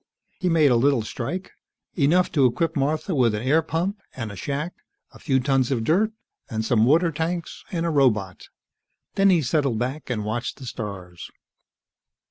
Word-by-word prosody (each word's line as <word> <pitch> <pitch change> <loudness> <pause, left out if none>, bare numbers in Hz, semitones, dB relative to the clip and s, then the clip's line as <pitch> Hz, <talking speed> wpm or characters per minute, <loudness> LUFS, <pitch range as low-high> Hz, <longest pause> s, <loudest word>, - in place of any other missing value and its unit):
He 180 - 0
made 155 -5 +4
a - - +4
little 135 -1 +3
strike, 175 - -5 0.4
enough 175 +4 +2
to 140 -5 +4
equip 165 +7 -1
Martha 155 +5 0
with 120 -7 +2
an 105 - -4
air 150 +5 +3
pump 175 +6 -2
and 115 -5 -5
a - - -8
shack, 145 - -3 0.4
a - - -15
few 135 -3 +1
tons 130 -1 +1
of 125 -5 0
dirt 195 - +2 0.4
and 110 -1 -2
some 115 -2 +3
water 165 +4 +4
tanks, 165 +2 -4
and 170 -2 -1
a 170 - 0
robot. 110 - +1 0.6
Then 195 0 +4
he 175 -5 +4
settled 140 -3 +1
back 130 +6 -3
and 110 -4 -2
watched 120 +3 -3
the 130 - -10
stars. 95 -7 -7
140 Hz, 175 wpm, -24 LUFS, 120-165 Hz, 0.6 s, made